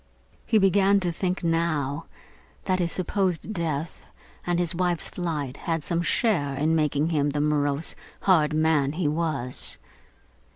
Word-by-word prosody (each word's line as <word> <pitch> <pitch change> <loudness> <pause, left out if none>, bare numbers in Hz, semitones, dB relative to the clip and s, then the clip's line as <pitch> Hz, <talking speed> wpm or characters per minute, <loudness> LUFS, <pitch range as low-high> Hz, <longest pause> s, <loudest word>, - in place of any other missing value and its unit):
He 225 - +3
began 195 0 +3
to 175 -2 -1
think 180 +2 -3
now, 165 -3 -1 0.6
that 185 0 0
his 170 -2 -1
supposed 185 +1 -2
death 160 -4 -3 0.5
and 175 -1 +1
his 175 -2 0
wife's 175 -1 -2
flight 150 -7 -4
had - - -15
had 160 -2 -3
some 170 +2 -1
share 170 - 0
in 155 +4 +1
making 150 0 0
him 145 -3 +1
the 145 +1 -2
morose, 145 0 0 0.3
hard 160 -6 +3
man 155 -2 +1
he 165 -1 -1
was. 150 -5 +4
165 Hz, 150 wpm, -25 LUFS, 150-180 Hz, 0.6 s, was